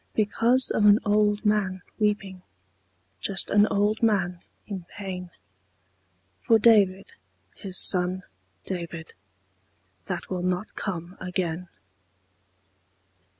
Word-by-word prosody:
Because 230 +4 +1
of 210 - +3
an 205 0 +7
old 210 0 +1
man 195 -3 0 0.2
weeping, 205 -3 -1 0.8
Just 195 - -2
an 205 +1 +5
old 205 +2 0
man 185 -6 +1 0.3
in 195 -4 -6
pain. 185 -3 -7 1.1
For 225 - +3
David, 205 - +3 0.4
his 190 -3 -3
son 185 0 +5 0.4
David, 170 -3 -5 0.9
That - - -4
will 185 -1 -4
not 180 +3 -2
come 180 -2 -5
again. 180 -1 -3
195 Hz, 100 wpm, -25 LUFS, 180-210 Hz, 1.1 s, an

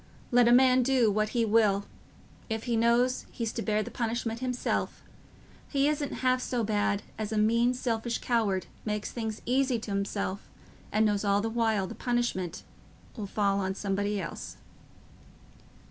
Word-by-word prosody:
Let 245 -1 +5
a - - +5
man 255 +1 +6
do 250 -4 +3
what 215 +1 +1
he 235 -1 +1
will, 210 -2 +3 0.6
if 220 0 -2
he 240 -2 -1
knows 235 +3 +2
he's 230 -2 -3
to 230 - -3
bear 215 -1 0
the - - -8
punishment 230 -1 -2
himself, 250 -1 -2 0.7
he 280 0 +2
isn't 295 -2 -1
half 255 0 +3
so 245 -2 -1
bad 205 -1 0 0.2
as 215 0 -3
a 220 - -1
mean 235 +3 +3
selfish 235 -1 -1
coward 215 -6 0
as - - -21 0.2
makes 210 0 -2
things 220 -2 -4
easy 260 0 +2
t' 220 -2 -6
himself 200 -1 -3 0.4
and 215 +1 +3
knows 205 -1 +1
all 200 -1 +3
the 225 +2 -1
while 220 -4 +1
the - - -7
punishment 240 -8 -2 0.5
'll 210 -4 -5
fall 200 0 +1
on 190 0 -2
somebody 200 +1 -1
else." - - -6
225 Hz, 165 wpm, -29 LUFS, 205-245 Hz, 0.7 s, man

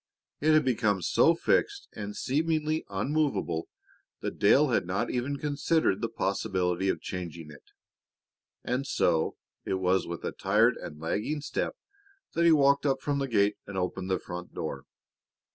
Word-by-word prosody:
It 155 +2 +3
had 155 -2 +4
become 105 -7 +1
so 165 - +4
fixed 400 - +1
and 105 -1 -6
seemingly 155 +2 0
immovable 135 - -1 0.5
that - - -4
Dale 140 +8 +5
had 115 -7 +1
not 95 +2 -1
even 130 +3 -2
considered 150 -5 +1
the - - -1
possibility 95 -2 -1
of - - -1
changing 85 -4 -6
it. 70 - -15 1.0
And 130 +3 -2
so 80 -9 +1 0.3
it - - -1
was 95 0 +1
with 85 0 -5
a - - -1
tired - - +3
and 75 - -8
lagging 105 - -2
step 145 - -2 0.6
that 170 - +2
he 170 - +7
walked 140 -1 +4
up 135 -1 +1
from 145 0 -1
the 135 - -1
gate 105 -3 +2
and 100 -1 -6
opened 95 +1 -2
the 95 - +2
front 90 0 -8
door. - - -4
110 Hz, 160 wpm, -28 LUFS, 95-145 Hz, 1.0 s, he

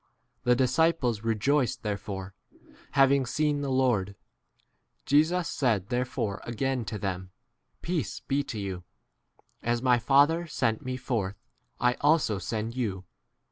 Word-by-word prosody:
The 125 0 +5
disciples 130 -3 +2
rejoiced 115 +4 +1
therefore, 100 -2 -4 0.6
having 135 -1 +4
seen 150 +3 +1
the 140 - -2
21 130 -1 +1
Lord. 105 -7 +1 0.9
Jesus 160 +5 +3
said 110 -11 0
therefore 125 -4 -2
again 125 +1 -2
to 105 - -4
them, 95 -2 -4 0.5
Peace 165 - -2
[be] 140 +1 -1
to 115 - -5
you: 95 -3 -4 0.8
as 120 +1 -1
my 125 -2 +4
Father 145 +7 +4
sent 115 -7 0
me 130 0 -3
forth, 110 -6 -2 0.4
I 125 0 +3
* - - -17
also 145 -9 +3
send 110 +2 -3
22 130 - -3
you. 95 -5 -3
125 Hz, 140 wpm, -28 LUFS, 105-140 Hz, 0.9 s, The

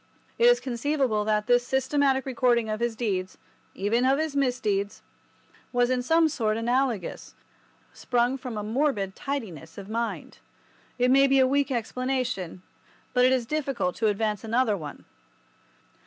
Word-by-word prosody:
It 470 - +6
is 485 0 +6
conceivable 255 - 0
that 210 -1 +1
this 245 +1 +4
systematic 265 0 +1
recording 240 -3 +1
of 215 - -2
his 235 -1 -1
deeds—even 205 +1 -3
of 265 +1 +3
his 310 -1 -2
misdeeds—was 245 0 -2
in 255 -1 +1
some 325 +5 +3
sort 225 -8 -1
analogous, 240 -4 -1 0.6
sprung 245 +1 0
from 250 -3 -6
a 210 - -3
morbid 215 -4 -1
tidiness 195 - -5
of 200 0 -9
mind. 230 +1 -4 0.6
It 250 0 +3
may 275 +1 +6
be 270 0 +3
a 260 - +6
weak 280 +2 +1
explanation, 250 -7 -2 0.5
but 250 0 +4
it 255 - +4
is 255 -2 +1
difficult 275 -9 -2
to 225 - +1
advance 210 0 -1
another 225 -1 +1
one. 150 -6 -8
245 Hz, 140 wpm, -26 LUFS, 215-265 Hz, 0.6 s, It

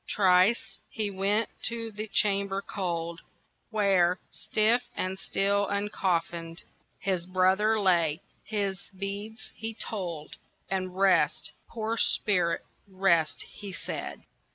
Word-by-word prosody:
Thrice 190 +3 +3
he 215 -2 -1
went 200 +3 +1 0.2
to 230 -1 -1
the 215 +1 -5
chamber 200 -2 +1
cold, 170 -3 -3 0.5
Where, 195 -5 +3
stiff 220 +3 +2
and 185 +1 -2
still 200 +1 +1
uncoffinèd, 175 -5 -1 0.3
His 180 -2 -1
brother 190 +4 +3
lay, 170 -4 +3 0.2
his 200 -3 -1 0.2
beads 205 +4 -5
he 225 0 -5
told, 175 -9 -5 0.3
And 185 -1 -2
"Rest, 195 -1 +3 0.2
poor 225 0 -2
spirit, 180 -7 +2 0.2
rest," 185 -5 +2
he 205 -2 -9
said. - - -5
195 Hz, 105 wpm, -28 LUFS, 180-210 Hz, 0.5 s, Thrice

